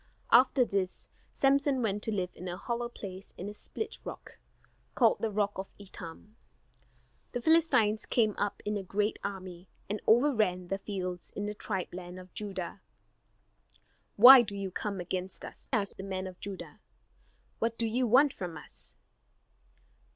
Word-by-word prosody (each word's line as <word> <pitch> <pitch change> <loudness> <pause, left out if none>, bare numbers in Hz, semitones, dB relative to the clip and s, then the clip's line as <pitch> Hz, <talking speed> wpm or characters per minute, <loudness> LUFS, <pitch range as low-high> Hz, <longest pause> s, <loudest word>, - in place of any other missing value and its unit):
After 255 +1 +6
this 195 -4 -2 0.2
Samson 275 -1 +2
went 205 -1 0
to 220 - -1
live 185 -4 -1
in 180 - -8
a 175 0 -4
hollow 235 +3 -3
place 195 -4 -9
in 185 - -5
a 205 - -5
split 440 - -6
rock, - - -9 0.6
called - - +4
the 225 - 0
rock 205 -1 -1
of 190 - -5
Etam. 200 +2 -11 1.0
The 245 - -2
Philistines 260 -10 +3
came 215 -4 +2
up 205 - -2
in 210 0 0
a - - -3
great 205 +3 -1
army, 185 -2 -6 0.2
and 210 +1 -3
overran 215 -8 +3
the 195 - -1
fields 185 -3 -4
in 205 - -3
the 210 - -3
tribe 190 -4 -4
land 180 0 -7
of 185 0 -13
Judah. 195 -2 -5 1.3
"Why 250 +4 +11
do 205 -3 -5
you 195 -1 -4
come 200 +1 -3
against 185 +1 -4
us?" - - -10
asked 210 -6 0
the 195 - -6
men 190 -1 -3
of 185 -1 -8
Judah, 195 -2 -7 0.8
"what 230 0 0
do 230 - +1
you 245 +3 +1
want 265 +5 +5
from 175 -4 -6
us?" 150 - -7
205 Hz, 160 wpm, -30 LUFS, 185-230 Hz, 1.3 s, Why